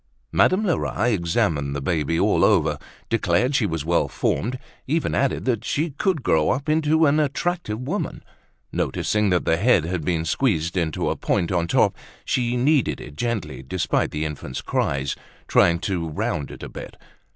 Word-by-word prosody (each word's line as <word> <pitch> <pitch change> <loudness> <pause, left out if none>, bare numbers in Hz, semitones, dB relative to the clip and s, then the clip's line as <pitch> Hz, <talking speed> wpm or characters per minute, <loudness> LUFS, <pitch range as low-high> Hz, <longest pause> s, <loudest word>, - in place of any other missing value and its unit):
Madame 200 +4 +3
Lerat 120 - 0
examined 80 -6 0
the - - -1
baby 80 +2 0
all - - +3
over, - - +3 0.3
declared 115 +4 +1
she 115 -6 +2
was 80 -4 -3
well 85 +1 +2
formed, 125 +4 -1 0.3
even 160 +4 0
added 135 -1 0
that 120 -4 0
she 155 +6 -1
could 155 +1 -1
grow 80 -7 +2
up 140 +2 -1
into 155 +1 +3
an 145 +1 +3
attractive 150 -5 -1
woman. 150 +11 -4 0.5
Noticing 105 -1 0
that 90 -1 +1
the 80 - +2
head 100 -4 +3
had 85 -1 -2
been 80 -1 0
squeezed 85 - 0
into 80 -5 0
a - - -1
point 85 - 0
on 85 -2 +1
top, - - +3 0.3
she 125 -1 0
kneaded 140 +2 +2
it 70 - -10
gently 115 - -3
despite 75 +7 -1
the 75 +1 -3
infant's 70 -4 -5
cries, 70 0 -1 0.3
trying 85 -1 +4
to 85 -5 -2
round 75 -2 -2
it - - -10
a - - -6
bit. - - -9
100 Hz, 170 wpm, -23 LUFS, 80-135 Hz, 0.5 s, trying